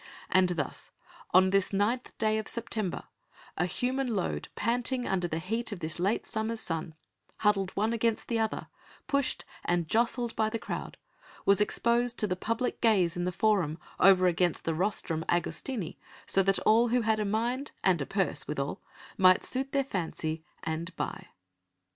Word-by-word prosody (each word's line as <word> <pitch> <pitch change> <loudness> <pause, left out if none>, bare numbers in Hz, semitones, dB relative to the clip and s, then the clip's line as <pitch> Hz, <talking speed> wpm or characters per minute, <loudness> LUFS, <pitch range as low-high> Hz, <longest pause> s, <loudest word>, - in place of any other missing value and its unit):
And 185 -1 +5
thus, 160 -6 -3 0.4
on 185 +1 +5
this 195 -1 +2
ninth 210 +6 0
day 215 -1 +1
of 215 - -5
September, 220 -5 -2 0.5
a 175 - 0
human 250 +3 -1
load 185 - -2
panting 245 +2 0
under 180 -2 0
the 160 - -3
heat 225 +8 -2
of 205 - -5
this 160 +1 -4
late 195 +5 +1
summer's 220 +1 -2
sun, 165 -4 -4 0.5
huddled 200 -3 +3
one 215 +3 +1
against 230 -1 0
the 230 -1 0
other, 220 -1 -1 0.4
pushed 280 -1 0 0.2
and 175 -2 0
jostled 235 +3 +1
by 220 -1 +1
the 230 - -2
crowd, - - -6 0.5
was 200 +1 +5
exposed 235 +3 +2
to - - +2
the 185 -3 -1
public 230 +6 -2
gaze 195 -7 +3
in 175 0 -1
the 180 - 0
Forum 185 -5 +1 0.2
over 185 -1 +6
against 175 -1 +1
the 165 - 0
rostrum 165 -2 -1
Augustini, 175 - -1 0.3
so 195 - +3
that 195 0 +3
all 230 +2 +5
who 245 +1 +2
had 220 -1 +1
a - - +1
mind, 235 +7 -1
and 180 -5 +3
a 140 - -3
purse 195 -2 -1
withal, 140 -2 -3 0.4
might 185 -1 +6
suit 265 +1 0
their 275 -1 +2
fancy 160 -8 -3 0.2
and 165 +2 -3
buy. - - -4
205 Hz, 170 wpm, -29 LUFS, 175-230 Hz, 0.5 s, over